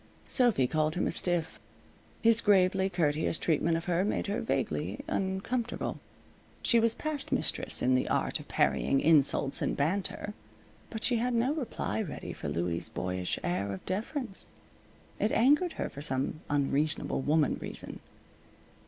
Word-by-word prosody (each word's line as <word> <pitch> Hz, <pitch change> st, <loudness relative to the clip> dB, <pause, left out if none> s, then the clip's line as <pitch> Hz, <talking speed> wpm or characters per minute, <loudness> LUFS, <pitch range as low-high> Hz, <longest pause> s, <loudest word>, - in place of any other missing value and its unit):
Sophy 240 Hz, -, +2 dB
called 155 Hz, +4 st, 0 dB
him 180 Hz, -, 0 dB
a -, -, 0 dB
stiff. 175 Hz, -1 st, -1 dB, 0.6 s
His 230 Hz, 0 st, +5 dB
gravely 190 Hz, -2 st, +3 dB
courteous 160 Hz, -3 st, +1 dB
treatment 165 Hz, 0 st, +1 dB
of 165 Hz, -, -6 dB
her 180 Hz, 0 st, +1 dB
made 205 Hz, -, -1 dB
her 205 Hz, +2 st, -2 dB
vaguely -, -, -2 dB
uncomfortable. 200 Hz, +6 st, -2 dB, 0.6 s
She 235 Hz, -, +4 dB
was 230 Hz, 0 st, +3 dB
past 305 Hz, -2 st, -3 dB
mistress -, -, +2 dB
in 130 Hz, -, +3 dB
the 130 Hz, -, +1 dB
art -, -, 0 dB
of -, -, -11 dB
parrying 135 Hz, -, +1 dB
insults 145 Hz, -2 st, +4 dB
and -, -, -1 dB
banter, 190 Hz, +6 st, -1 dB, 0.6 s
but 220 Hz, -2 st, -6 dB
she 245 Hz, -, +3 dB
had 245 Hz, +1 st, 0 dB
no 245 Hz, +5 st, +2 dB
reply 265 Hz, -6 st, -3 dB
ready 180 Hz, -9 st, -6 dB
for -, -, -6 dB
Louie's 85 Hz, 0 st, -2 dB
boyish 90 Hz, 0 st, -2 dB
air 95 Hz, +3 st, -1 dB
of 95 Hz, -, -7 dB
deference. 215 Hz, -, -4 dB, 0.7 s
It 210 Hz, -, +1 dB
angered 295 Hz, +9 st, +3 dB
her -, -, -3 dB
for 140 Hz, -, -9 dB
some 135 Hz, +2 st, -2 dB
unreasonable 145 Hz, 0 st, 0 dB
woman 150 Hz, +1 st, +1 dB
reason. -, -, -3 dB
180 Hz, 150 wpm, -30 LUFS, 145-225 Hz, 0.7 s, His